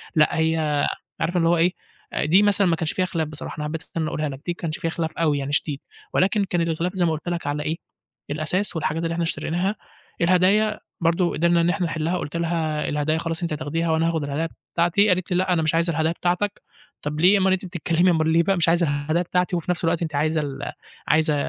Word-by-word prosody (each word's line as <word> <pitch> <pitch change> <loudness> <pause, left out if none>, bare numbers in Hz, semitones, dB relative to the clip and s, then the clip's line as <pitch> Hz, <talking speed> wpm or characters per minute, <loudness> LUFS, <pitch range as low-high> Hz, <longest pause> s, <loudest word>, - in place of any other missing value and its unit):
لأ 155 0 +3
هي 160 -2 +1 0.4
عارف 175 +2 0
اللي 165 -1 +3
هو 175 - +3
إيه 175 +3 +3 0.5
دي 165 +6 +5
آآ - - +3
مثلًا 205 -1 +4
ما 170 - +3
كانش 160 -1 -2
فيها 185 - +1
خلاف 165 -3 -2
بصراحة، 150 0 -7
أنا 150 - -3
حبّيت 155 +1 -4
اللي - - -31
أنا 160 - 0
أقولها 155 -1 -2
لك 135 - -6
دي 175 - -1
ما - - -17
كانش 160 -1 -2
فيها 165 -2 -1
خلاف 160 -1 -2
أوي 155 -4 +1
يعني 140 +1 -4
شديد، 145 -1 -1 0.3
ولكن 200 +2 +2
كان 175 -2 -1
الخلاف 165 +2 -1
زي 180 -2 +2
ما 165 - +2
قلت 155 +3 -4
لك 170 -4 -3
على 145 +1 -1
إيه 160 +2 -2 0.5
الأساس 160 +7 0
والحاجات 160 +1 -1
اللي 165 0 -1
إحنا 170 0 -1
اشتريناها، 175 +5 -1 0.5
الهدايا 190 +5 +3 0.2
برضه 170 +1 +2
قدرنا 170 +2 +3
إن 170 - +2
إحنا 175 -1 0
نحلّها 165 +3 -1
قلت 170 -1 -4
لها 160 -3 -1
الهدايا 150 +2 0
خلاص 165 0 -2
أنتِ 170 - -1
هتاخديها، 160 +2 -1
وأنا 160 +1 +2
هاخد 160 -3 -1
الهدايا 150 +4 -2 0.3
بتاعتي 175 +5 +3
قالت 185 0 0
لي 180 - +2
لأ 185 0 +2
أنا 165 - +2
مش 155 +1 +1
عايزة 170 +1 +2
الهدايا 160 +1 +1
بتاعتك، 180 +4 -1 0.4
طَب 150 +1 -3
ليه 185 +5 +6
اُمّال 190 -1 +3
أنتِ 190 0 -2
بتتكلمي 175 0 +1
اُمّال 160 -1 +2
ليه 165 +1 +4
بقى 195 +2 +1
مش 165 -1 +3
عايزة 170 -1 +3
الهدايا 145 +4 0
بتاعتي، 180 +1 0
وفي 175 +1 -1
نفس 180 - -2
الوقت 165 0 +1
أنتِ 160 -3 -3
عايزة 155 +2 +1
ال 140 -2 -5 0.4
عايزة 155 -1 +3
165 Hz, 235 wpm, -23 LUFS, 155-175 Hz, 0.5 s, ليه